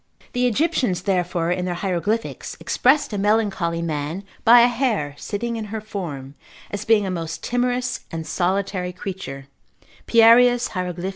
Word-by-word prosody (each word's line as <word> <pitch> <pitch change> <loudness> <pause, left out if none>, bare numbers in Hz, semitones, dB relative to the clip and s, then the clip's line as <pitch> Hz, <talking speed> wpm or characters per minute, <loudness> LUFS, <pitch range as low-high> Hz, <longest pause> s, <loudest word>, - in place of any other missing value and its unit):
The 250 -1 +2
Egyptians 245 - 0
therefore 180 -3 0
in 180 0 -1
their 180 -1 -2
hieroglyphics 195 +5 -2
expressed 265 -2 +2
a 205 - -2
melancholy 195 -5 +1
man 155 +3 -3 0.2
by 235 +1 +8
a 240 - +6
hare 235 - -1
sitting 230 +8 -4
in 220 - -4
her 220 +1 -5
form, 165 -11 -6 0.4
as 205 - -4
being 220 -2 +4
a 190 - -2
most 165 -2 -5
timorous 245 +1 -1
and 165 -1 -5
solitary 185 0 -1
creature, 180 -8 -7 0.6
Pierius 240 +1 +6
Hieroglyph. 180 -1 -3
195 Hz, 145 wpm, -22 LUFS, 175-230 Hz, 0.6 s, by